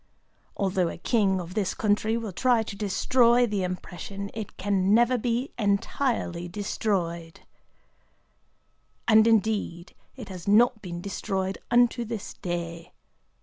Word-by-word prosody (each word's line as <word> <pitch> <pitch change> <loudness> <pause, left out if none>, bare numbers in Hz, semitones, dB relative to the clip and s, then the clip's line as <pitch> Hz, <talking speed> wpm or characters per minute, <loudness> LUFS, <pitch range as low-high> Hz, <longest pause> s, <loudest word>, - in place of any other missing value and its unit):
Although 190 -3 +1
a - - -7
king 195 0 +1
of 180 0 -7
this 195 -3 -1
country 215 +1 +1
will 225 -3 -4
try 240 +4 +2
to 210 - -7
destroy 235 +4 +3
the 210 -4 -2
impression, 185 +2 -5
it 220 -2 -7
can 195 0 +2
never 240 +2 +4
be 245 +2 -1
entirely 200 -3 0
destroyed.' 175 -4 -3 1.7
And 220 -1 +6
indeed 210 -5 0 0.2
it 240 -6 -9
has 185 -2 -9
not 225 +2 +4
been 175 -3 -6
destroyed 195 0 -3
unto 240 0 +3
this 225 -3 -6
day. 170 -1 -5
205 Hz, 125 wpm, -26 LUFS, 185-230 Hz, 1.7 s, And